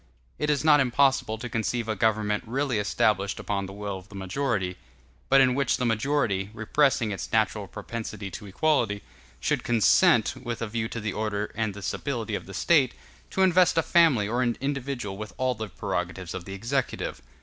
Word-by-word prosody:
It 150 - 0
is 150 0 +1
not 150 -2 +6
impossible 130 -3 +2
to 120 +3 -5
conceive 115 0 -2
a 110 - -1
government 105 0 +1
really 130 -1 0
established 100 -1 +1
upon 100 -1 -2
the - - -9
will 100 -1 -5
of 95 +3 -18
the 100 - -12
majority; 95 -1 -2 0.5
but 135 0 +7
in 130 -1 +4
which 140 -1 +1
the 125 - -1
majority, 115 -4 0
repressing 115 0 +2
its 95 -4 -5
natural 110 -2 +1
propensity 105 -1 -6
to 105 +3 -8
equality, 115 -3 +1 0.4
should - - 0
consent, 120 - +4
with 120 -3 -5
a 115 - -2
view 110 +1 -2
to 115 - -5
the 110 -1 -3
order 105 -1 -2
and 110 -2 -2
the 105 - -8
stability 115 -3 -3
of 100 - -4
the 95 - -8
State, 140 -1 +3 0.3
to 190 - +1
invest 180 -2 +4
a 165 - +4
family 155 -13 +4
or 120 +4 0
an 120 -2 0
individual 135 -7 -3
with 110 0 -7
all 130 0 +1
the 110 -2 -6
prerogatives 90 +1 -4
of 95 -2 -6
the 95 - -7
executive. 120 +6 -2
110 Hz, 190 wpm, -26 LUFS, 105-135 Hz, 0.5 s, but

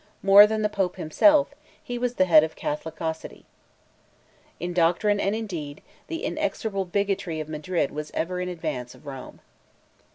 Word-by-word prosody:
More 200 +2 +9
than 215 0 -1
the - - +3
Pope 195 -4 -2
himself, 285 - +3 0.3
he 245 0 -5
was 245 0 -1
the 185 - +3
head 160 -4 +7
of 160 - -4
Catholicity. 160 +1 -5 1.1
In 175 +1 -4
doctrine 180 +5 +2
and 200 +2 0
in 225 0 -3
deed, 155 -7 -7 0.2
the 330 0 -5
inexorable 195 -4 -2
bigotry 190 -3 -2
of 155 - -5
Madrid 155 0 -2
was 150 0 -6
ever 180 +2 -2
in 180 - -3
advance 125 -8 -5
of - - -19
Rome. 135 -2 -9
180 Hz, 160 wpm, -25 LUFS, 155-205 Hz, 1.1 s, More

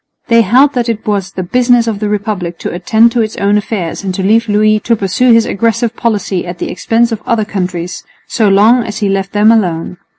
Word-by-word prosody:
They 230 0 +5
held 255 +7 +3
that 245 -2 -1
it 225 -2 -3
was 200 -3 -2
the 185 - -4
business 245 +4 +2
of 220 -3 -3
the 210 -1 -2
Republic 200 -5 -3
to - - -5
attend 220 +6 +2
to 235 -1 0
its 215 -1 -3
own 200 +1 +1
affairs 200 -4 -3
and 190 - -2
to 190 - -3
leave 225 +3 +2
Louis 215 +1 +2
to 230 +2 0
pursue 210 +5 +1
his 230 -1 +4
aggressive 230 +2 -1
policy 205 -6 -2
at 175 0 -6
the - - -4
expense 230 +1 0
of 220 -2 -4
other 225 -2 0
countries, 180 -3 -4 0.2
so 220 -4 +1
long 220 +5 +4
as 215 -2 -6
he 210 -4 -1
left 195 0 -2
them 210 +2 +3
alone. 180 -5 -1
215 Hz, 225 wpm, -12 LUFS, 195-230 Hz, 0.2 s, They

